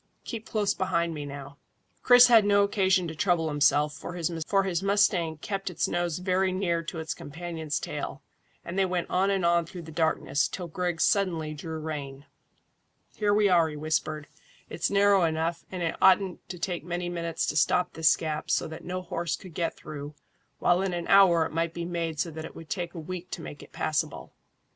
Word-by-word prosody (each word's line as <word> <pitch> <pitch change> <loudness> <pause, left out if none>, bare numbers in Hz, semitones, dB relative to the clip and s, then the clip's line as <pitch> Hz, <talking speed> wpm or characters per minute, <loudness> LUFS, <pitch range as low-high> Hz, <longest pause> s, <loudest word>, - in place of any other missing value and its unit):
Keep 225 -2 -6
close 210 -2 +1
behind 170 -3 0
me 145 -2 -5
now." 140 0 -9 0.4
Chris 245 0 +8
had 230 -3 +7
no 200 0 +4
occasion 190 -3 +2
to 160 - -5
trouble 165 0 +1
himself, 145 0 +3
for 155 +4 -7
his 175 +2 0
mustang 195 -5 +2
kept 195 +4 -4
its 180 - -1
nose 175 -2 -1
very 185 +1 +1
near 180 -3 0
to 165 +1 -7
its 160 -1 -3
companion's 160 -1 -5
tail, - - -5 0.4
and 175 +3 -3
they 195 - +4
went 180 -2 -2
on 190 +2 +2
and 195 -3 +1
on 170 0 +3
through 170 +1 -9
the 160 - -10
darkness, 160 -3 +1
till 180 -2 -6
Griggs 175 0 -1
suddenly 170 -6 +1
drew 160 +2 -6
rein. 145 -3 -6 0.9
"Here 210 -1 0
we 205 0 +4
are," 170 -4 +4
he 150 - -7
whispered. 155 0 -2 0.5
"It's 170 - -1
narrow 200 -1 +4
enough, 165 +1 -1
and 180 -2 -4
it 165 - -1
oughtn't 190 -1 +3
to 180 - -6
take 175 -1 -3
many 175 +1 -3
minutes 170 -1 -2
to - - -2
stop 180 +3 +2
this 160 -1 +4
gap 155 -1 -4
so - - +1
that 160 - -9
no 185 +1 -4
horse 170 -2 -2
could 185 -4 -12
get 165 0 -2
through, 145 0 -8 0.4
while 175 +1 +3
in 190 -2 -1
an 175 -1 -3
hour 180 -5 +6
it - - -5
might 165 +1 -1
be 170 0 -3
made 165 -3 -3
so 165 +1 -1
that 160 0 -7
it - - -9
would 165 -2 -11
take 175 -1 -3
a - - -5
week 180 +2 -6
to 165 - -6
make 145 - -8
it - - -14
passable. 155 -1 -2
170 Hz, 200 wpm, -27 LUFS, 160-185 Hz, 0.9 s, Chris